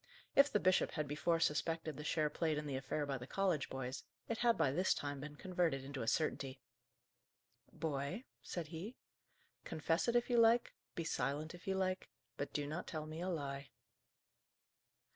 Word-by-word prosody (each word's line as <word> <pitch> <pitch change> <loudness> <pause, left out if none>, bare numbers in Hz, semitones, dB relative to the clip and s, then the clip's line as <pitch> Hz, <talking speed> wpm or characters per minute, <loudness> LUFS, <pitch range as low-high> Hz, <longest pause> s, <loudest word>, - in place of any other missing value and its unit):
If 280 +1 +7
the 210 - +3
bishop 185 0 +3
had 150 -2 -1
before 155 +3 +1
suspected 160 0 +1
the 150 - -6
share 150 -1 +1
played 155 -1 +1
in 150 - -2
the 140 -2 -2
affair 135 +3 -1
by 135 -2 -2
the 125 - -7
college 185 -6 +1
boys, 130 0 -4 0.2
it 230 - -2
had 235 -1 +4
by 145 -5 +3
this 180 +7 +3
time 145 -1 -3
been 145 +1 -6
converted 170 -5 0
into 140 -1 -4
a 115 - -3
certainty. 135 -3 0 1.1
"Boy," 145 - -2 0.2
said 170 -4 -4
he, 180 +10 -6 0.7
"confess 165 +5 0
it 235 - +2
if 240 - +4
you 240 -2 +4
like, 230 +1 +5 0.2
be 170 - -1
silent 150 +1 -1
if 175 +1 -12
you 190 - +2
like; 185 0 0 0.3
but 145 - -3
do 145 - -1
not 155 +5 -4
tell 155 -3 -3
me 155 +2 -5
a 185 - -1
lie." 140 -4 -3
155 Hz, 180 wpm, -38 LUFS, 145-180 Hz, 1.1 s, If